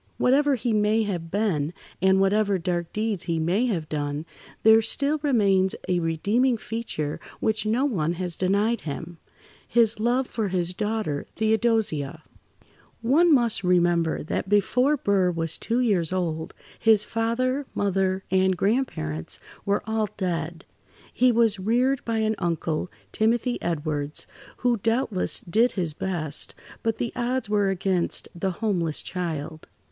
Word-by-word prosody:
Whatever 280 +2 +3
he 240 -1 -1
may 215 +1 +2
have 175 -5 -4
been, 175 -6 0 0.3
and 190 +1 +4
whatever 200 +1 +2
dark 175 -1 -2
deeds 210 -4 -2
he 170 -2 -1
may 180 +10 +1
have 170 -9 -2
done, 145 0 -3 0.4
there 220 0 +7
still 280 +7 0
remains 200 -9 +3
a 180 -1 +1
redeeming 205 +10 +1
feature 215 -11 -4 0.2
which 215 0 0
no 240 +6 +2
one 175 - 0
has 175 -1 -3
denied 205 +5 +1
him—his 175 +8 -2
love 245 +4 +1
for 220 -4 -2
his 180 -1 -1
daughter, 210 -7 -2
Theodosia. 220 -10 +1 0.8
One 315 +9 +4
must 235 -7 +3
remember 175 -2 +2
that 170 +4 -3
before 250 +8 +3
Burr 195 -6 +2
was 165 -2 -1
two 235 +2 -1
years 190 -9 +1
old, 165 -4 -2 0.2
his 220 -2 +5
father, 255 +5 -1
mother, 190 -1 0
[Pg 190 0 +3
61]and - - -7
grandparents 175 - -1 0.3
were 200 0 +1
all 220 -1 -1
dead. 170 -2 -3 0.5
He 255 0 +4
was 225 -3 +3
reared 245 +7 +1
by 230 -1 -1
an 220 0 +1
uncle, 165 0 -1 0.2
Timothy 235 +2 0
Edwards, 150 -3 -3 0.3
who 245 -1 +1
doubtless 225 -2 0
did 225 +8 +2
his 175 -6 -2
best, 160 -4 -2 0.3
but 225 -1 -1
the 235 - -3
odds 245 -2 -1
were 205 -2 +2
against 190 -2 0
the 175 +2 -2
homeless 180 -5 -1
child. 160 -3 -5
200 Hz, 140 wpm, -25 LUFS, 170-225 Hz, 0.8 s, there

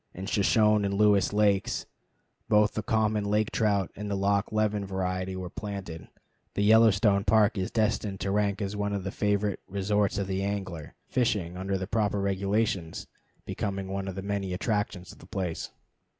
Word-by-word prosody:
In 95 - -6
Shoshone 105 +1 +3
and 100 0 0
Lewis 100 -2 +4
lakes 105 +2 +1 0.6
both 105 0 +4
the 110 - -2
common 110 -1 +1
lake 105 +1 +1
trout 100 -4 +1
and 105 +1 -5
the 100 - -1
Loch 100 +1 +1
Leven 105 -1 +1
variety 95 -1 -2
were 95 -1 -5
planted. 100 -6 -6 0.5
The 100 - +1
Yellowstone 105 -2 +5
Park 110 +1 +4
is 95 -2 -2
destined 105 -3 0
to 95 +1 -1
rank 105 0 0
as 100 +1 -3
one 105 0 -1
of 100 -2 -2
the 95 - -3
favorite 105 -1 0
resorts 100 0 0
of 100 - 0
the 95 0 -2
angler, 95 -6 -4
fishing, 105 -8 0
under 95 +1 -2
the 95 - -3
proper 105 0 0
regulations, 100 -2 -1 0.4
becoming 95 -1 -3
one 95 0 -3
of 95 - -5
the 95 - -5
many 100 -2 -2
attractions 100 -2 -2
of - - -16
the - - -14
place. 90 -4 -3
100 Hz, 175 wpm, -28 LUFS, 95-105 Hz, 0.6 s, Yellowstone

